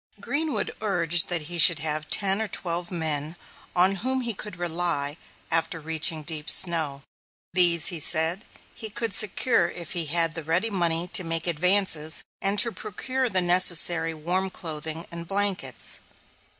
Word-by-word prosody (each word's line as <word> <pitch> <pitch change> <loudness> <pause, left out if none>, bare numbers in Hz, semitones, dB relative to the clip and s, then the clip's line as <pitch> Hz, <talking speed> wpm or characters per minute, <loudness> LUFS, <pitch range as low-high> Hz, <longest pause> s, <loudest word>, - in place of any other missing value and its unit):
Greenwood 290 -7 -3
urged 175 -5 +2
that 170 -3 -2
he 170 +3 -5
should 165 0 +8
have 155 0 -4
ten 195 +1 +3
or 220 - -1
twelve 175 -2 -4
men 155 -2 -3 0.4
on 185 +2 +3
whom 260 +6 -1
he 235 -2 -3
could 210 -1 -9
rely 170 -4 -2 0.4
after 165 +1 0
reaching 160 0 +1
deep 150 -1 -5
snow. 155 -6 +4 0.5
These, 175 -3 +3
he 170 - -4
said, 165 +6 0 0.3
he 220 - -8
could 225 0 -3
secure 210 -3 +2
if 175 -1 -8
he 170 -3 -2
had 165 +1 +1
the 165 - -4
ready 180 +8 0
money 170 -2 0
to 185 - +3
make 165 -1 0
advances 170 -2 +1 0.2
and 195 +1 0
to 235 +3 +5
procure 255 +5 -3
the 190 -3 +1
necessary 175 -2 +3
warm 180 +5 -2
clothing 160 -1 -6
and 170 0 -7
blankets. 195 - -2
175 Hz, 155 wpm, -24 LUFS, 160-195 Hz, 0.5 s, should